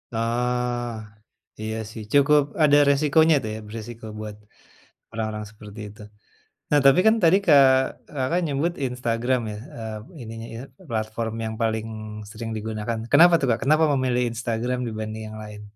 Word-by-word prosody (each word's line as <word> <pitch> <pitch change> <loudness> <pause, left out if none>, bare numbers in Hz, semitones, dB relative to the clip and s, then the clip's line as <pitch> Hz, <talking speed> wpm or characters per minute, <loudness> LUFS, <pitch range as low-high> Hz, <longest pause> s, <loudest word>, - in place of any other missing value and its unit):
Ah, 120 +1 -1 0.7
iya 110 0 -3 0.2
sih, 110 - -8
cukup 145 +1 +5 0.2
ada 145 -1 +6
resikonya 155 +2 +4
tuh 110 - -3
ya, 110 - -6
beresiko 115 +1 -8
buat 105 -1 -6 0.8
orang-orang 110 -1 -4
seperti 105 0 -12
itu. 105 +1 -15 0.7
Nah, 145 - +5
tapi 135 +4 +7
kan 220 - +6
tadi, 170 +4 +6
Kak 145 -4 +7 0.5
Kakak 135 +6 0
menyebut 155 +3 0
Instagram 125 0 -1
ya, 105 - -6 0.2
eee, 110 -1 -5 0.3
ininya, 115 0 -8
ie 115 - -7 0.3
platform 110 0 -3
yang 110 - -4
paling 110 -1 0 0.5
sering 115 0 -6
digunakan. 110 +1 -3
Kenapa 170 +4 +7
tuh, 135 - +1
Kak, 115 - +1
kenapa 155 +3 +4
memilih 125 -2 +1
Instagram 120 +1 -2
dibanding 110 0 -5
yang 110 - -9
lain? 105 0 -10
115 Hz, 150 wpm, -24 LUFS, 110-135 Hz, 0.8 s, tapi